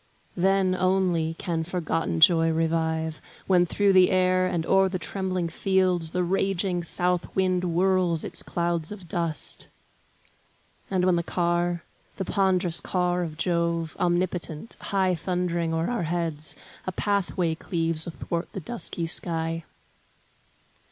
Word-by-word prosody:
Then, 190 +1 +2
only, 185 -3 +1
can 165 -3 -2
forgotten 165 - -2
joy 165 -1 +6
revive, 160 -1 0 0.2
When 180 -2 +4
through 200 +2 +2
the 185 -1 +6
air, 185 0 +3
and 170 -3 -1
o'er 195 +1 +4
the 185 - -2
trembling 185 0 -2
fields 180 -1 +1
The 180 0 0
raging 190 0 0
south 180 +1 0
wind 185 -1 +2
whirls 180 -1 +1
its - - 0
clouds 170 -1 -1
of 195 -4 -9
dust; 165 -2 -2 1.2
And 185 -2 +1
when 180 -2 +3
the - - +1
car, 175 0 0 0.3
the 190 - -2
pondrous 185 -4 +2
car 180 -1 0
of 160 -3 -4
Jove, 170 -2 0
Omnipotent, 175 0 -1
high 190 -2 +1
thundering 175 -1 -1
o'er 165 +6 0
our 240 - -1
heads, 165 -3 -2 0.3
A - - 0
pathway 185 -3 0
cleaves 165 -1 -1
athwart 170 +1 -4
the - - -4
dusky 180 -3 -2
sky. 165 -1 -2
175 Hz, 130 wpm, -26 LUFS, 165-185 Hz, 1.2 s, joy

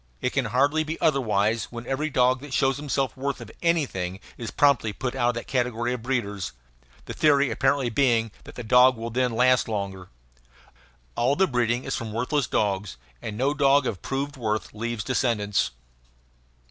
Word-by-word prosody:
It 125 - -1
can 135 -2 +1
hardly 140 +8 +2
be 160 +1 -5
otherwise 115 -6 +1
when 120 0 -9
every 145 +5 -1
dog 130 -2 +3
that 140 -3 -5
shows 135 0 +2
himself 135 -2 -1
worth 130 -4 -4
anything 125 - 0 0.2
is 115 -2 -6
promptly 130 -7 +2
put 125 +4 -3
out 120 -2 +1
of - - +1
the 120 - -4
category 125 -1 -1
of 125 - -5
breeders 105 - -2 0.5
the - - -6
theory 140 -4 +3
apparently 135 +1 +1
being 115 -4 +2
that - - -12
the 125 - -6
dog 125 +2 +5
will 115 +1 -5
then 125 +1 +1
last 125 +2 +3
longer. 100 -4 -4 1.1
All 125 +4 +2
the 190 - +4
breeding 120 -4 0
is 135 - -2
from 110 -2 -5
worthless 125 +4 0
dogs, 100 - -1 0.2
and 105 - -5
no 135 +4 +1
dog 140 -2 +4
of 100 -7 -3
proved 140 +1 -3
worth 110 -3 -2
leaves 115 0 -3
descendants. 115 -6 0
125 Hz, 170 wpm, -25 LUFS, 110-135 Hz, 1.1 s, dog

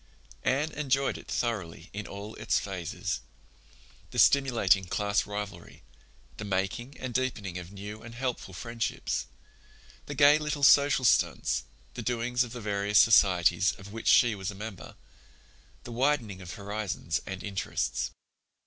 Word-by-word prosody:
Anne 150 +4 +1
enjoyed 140 -2 0
it - - -10
thoroughly 95 -8 -3
in 105 +1 -5
all 100 +2 -7
its - - +1
phases—the - - -7
stimulating 120 -9 +4
class 100 +3 0
rivalry, 105 -4 -7 0.5
the - - -6
making 105 +7 -2
and 130 -2 -5
deepening 105 -8 -2
of 90 +1 -10
new 105 +2 -8
and 115 0 -10
helpful 120 -5 -3
friendships, 115 +5 -3 0.8
the 145 - -5
gay 145 +2 +6
little 150 -2 -3
social 140 -1 +6
stunts, - - +2 0.3
the - - -5
doings 125 +1 0
of 120 - -8
the 125 - -6
various 100 0 +1
societies 95 -5 +5
of 100 +1 -12
which 115 - -6
she 120 -2 +6
was 95 -2 -4
a 105 - -6
member, 100 -4 -8 0.9
the 120 - -9
widening 120 -6 0
of 90 -1 -8
horizons 100 -5 -3
and 95 -1 -5
interests. 100 -2 -2
110 Hz, 140 wpm, -29 LUFS, 100-125 Hz, 0.9 s, gay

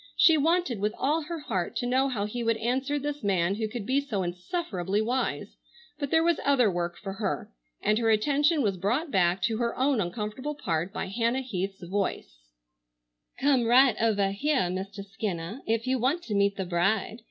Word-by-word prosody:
She 325 - +7
wanted 315 - +1
with 210 +2 -1
all 300 +4 +1
her 330 +2 -5
heart 190 - -3
to - - -1
know 260 +2 +2
how 210 -6 -2
he 240 +3 -4
would 230 -1 +1
answer 260 +6 -1
this 290 +1 -4
man 190 -2 +2
who 215 +1 -2
could 215 -1 -6
be 270 +5 +2
so 215 -9 -2
insufferably 190 - -2
wise, 245 +4 -2 0.4
but 285 -2 -2
there 325 +2 +3
was 340 -1 +2
other 255 -7 +4
work 175 -1 -3
for 195 -2 -6
her, 200 -1 -3 0.3
and 215 +1 +2
her 225 -1 +2
attention 290 +7 +3
was 195 -4 0
brought 245 - -1
back 180 -1 +2
to 220 +3 +1
her 235 0 -1
own 265 -3 +2
uncomfortable 215 +10 -4
part 175 - -2
by - - -3
Hannah 230 +6 0
Heath's 195 -5 -4
voice: 175 - -3 0.9
"Come 265 -3 +3
right 250 0 +6
ovah 205 -4 +2
heah, 255 -3 0
Mistah 195 +2 -5
Skinnah, 195 +2 -5
if 225 +1 0
you 260 0 +1
want 280 +9 +1
to 220 - -4
meet 200 0 +2
the 190 - -3
bride. 195 +6 0
225 Hz, 190 wpm, -27 LUFS, 195-270 Hz, 0.9 s, She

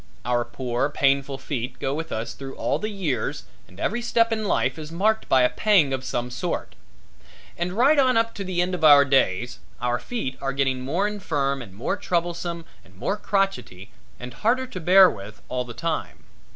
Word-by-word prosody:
Our 120 0 +1
poor, 125 +2 -2
painful 140 -1 +1
feet 130 -2 -5
go 135 - -2
with 160 +2 -5
us 110 +1 -3
through 135 -1 -8
all - - -1
the 215 - -3
years 190 -10 -2 0.2
and 90 - -17
every 240 +4 -1
step 230 -1 +2
in 220 -1 -1
life 180 - 0
is 155 0 -8
marked 215 +6 0
by 130 -1 +5
a 125 - +4
pang 160 0 +3
of 130 -1 -3
some 125 -1 -3
sort. - - -3 0.8
And 175 +1 -3
right 275 +8 +4
on 255 -3 +4
up 230 0 +1
to 200 - -5
the 180 -2 0
end 180 +1 -3
of 180 - -3
our 145 -2 +8
days, 125 -4 +1 0.2
our 120 0 0
feet 175 - -4
are 135 0 -2
getting 135 -2 0
more 170 +10 0
infirm 145 -10 -2
and 100 -6 -11
more 115 - -2
troublesome 170 -1 -2 0.2
and 90 - -21
more 150 - -2
crotchety 195 - -2 0.3
and 125 0 -8
harder 250 - +1
to 250 -8 -7
bear 185 +3 +7
with 105 - -7
all 125 -1 -2
the 120 -1 -9
time. 165 -1 -3
145 Hz, 195 wpm, -24 LUFS, 125-195 Hz, 0.8 s, our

